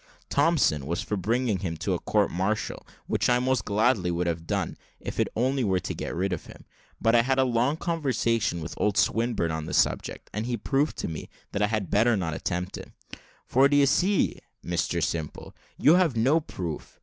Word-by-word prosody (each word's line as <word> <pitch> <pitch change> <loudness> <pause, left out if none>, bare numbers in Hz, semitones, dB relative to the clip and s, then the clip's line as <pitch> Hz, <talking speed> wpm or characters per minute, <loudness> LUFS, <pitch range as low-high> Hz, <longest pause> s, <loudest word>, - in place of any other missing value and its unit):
Thompson 140 - +2
was 85 +2 -2
for 105 - -2
bringing 110 +2 0
him 85 -4 -3
to - - -1
a - - -1
court - - +1
martial, 95 +5 -2 0.2
which - - 0
I 125 - +4
would 125 - -1
most 130 -7 +1
gladly 105 -3 +2
have 80 -1 -3
done, - - -1 0.2
if - - -6
it - - +3
only 130 +3 +1
were 95 -4 +2
to - - -4
get - - -5
rid 95 +2 0
of 85 - -6
him; - - -13 0.3
but 115 - +2
I 120 - +6
had 130 +2 0
a 130 - +5
long 125 +4 +1
conversation 125 - 0
with 80 +1 -6
old 105 -1 +1
Swinburne 115 -8 +1
on 80 0 -4
the - - -2
subject, - - 0
and 110 +3 -3
he 120 -1 -1
proved 140 +7 0
to - - -3
me 80 -2 -6 0.2
that 100 - -2
I 105 - +4
had 105 -3 -2
better 110 +2 +4
not 85 -4 -2
attempt 90 +5 -3
it. - - -11 0.5
"For, 135 +2 +4
d'ye 145 0 +5
see, 185 +8 +2 0.3
Mr 85 -1 -1
Simple, 80 -1 -4 0.2
you 150 - +5
have 175 -9 +3
no 135 +8 +4
proof. 85 - -6
110 Hz, 205 wpm, -27 LUFS, 90-130 Hz, 0.5 s, I